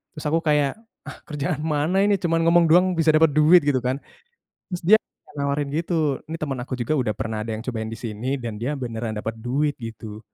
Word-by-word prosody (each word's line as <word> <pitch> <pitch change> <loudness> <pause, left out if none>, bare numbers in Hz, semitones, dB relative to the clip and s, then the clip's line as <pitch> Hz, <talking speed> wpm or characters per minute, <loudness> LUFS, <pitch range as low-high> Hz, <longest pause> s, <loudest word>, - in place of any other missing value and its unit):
Terus 150 - -7
aku 160 +2 +2
kayak, 150 -3 +2 0.3
"Ah, - - -8
kerjaan 150 +1 -2
mana 155 +4 +1
ini 205 0 +3
cuman 165 -2 +1
ngomong 170 0 +5
doang 180 +3 +6
bisa 160 -1 +5
dapet 160 0 +5
duit," 155 +4 +7
gitu 135 -3 +3
kan. 130 +2 -1 0.7
Terus 180 - -3
dia - - +6 0.4
nawarin 140 0 -1
gitu 155 -3 0
ini - - -2
temen 140 -4 -3
aku 130 - -7
juga 120 +6 0
udah 120 -4 0
pernah 110 0 -3
ada 115 - -4
yang 110 - -6
cobain 115 -3 -4
di - - -5
sini 115 +4 -3
dan 115 -3 -5
dia 120 +7 -2
beneran 115 -3 -4
dapet 115 +1 -4
duit 140 +6 0
gitu. 110 -2 -8
140 Hz, 210 wpm, -23 LUFS, 115-160 Hz, 0.7 s, duit